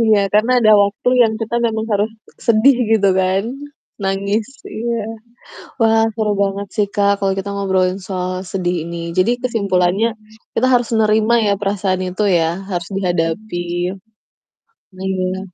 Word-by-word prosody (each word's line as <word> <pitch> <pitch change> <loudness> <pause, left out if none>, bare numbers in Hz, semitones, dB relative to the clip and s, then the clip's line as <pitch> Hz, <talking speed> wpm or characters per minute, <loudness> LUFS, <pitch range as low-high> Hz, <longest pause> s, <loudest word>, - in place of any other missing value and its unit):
Iya, 220 -2 +4 0.2
karena 215 +4 +3
ada 215 -3 +5
waktu 200 +4 -1
yang 225 -2 +2
kita 225 +1 -3
memang 220 -1 -2
harus 205 +2 +1 0.4
sedih 240 +3 +5
gitu 210 -3 +4
kan. 190 +1 +1 0.6
Nangis, 200 +2 -1 0.2
iya. 235 +2 -3 0.9
Wah 225 0 +4
seru 215 -2 0
banget 200 +1 -2
sih 210 - +2
Kak, 200 0 +3
kalau 195 -1 +1
kita 195 +1 -4
ngobrolin 190 -1 0
soal 185 -1 -3
sedih 180 -2 -1
ini 170 - -6 0.2
jadi 185 +5 +4
kesimpulannya 200 -3 +1 0.5
kita 250 - +3
harus 245 -2 +3
nerima 215 +1 +3
ya 200 - +3
perasaan 195 -2 -1
itu 185 +4 -3 0.2
ya 165 0 +1 0.2
harus 175 -2 -3
dihadapi. 175 +1 -1 1.4
Iya. 190 -1 -2
200 Hz, 140 wpm, -18 LUFS, 185-220 Hz, 1.4 s, ada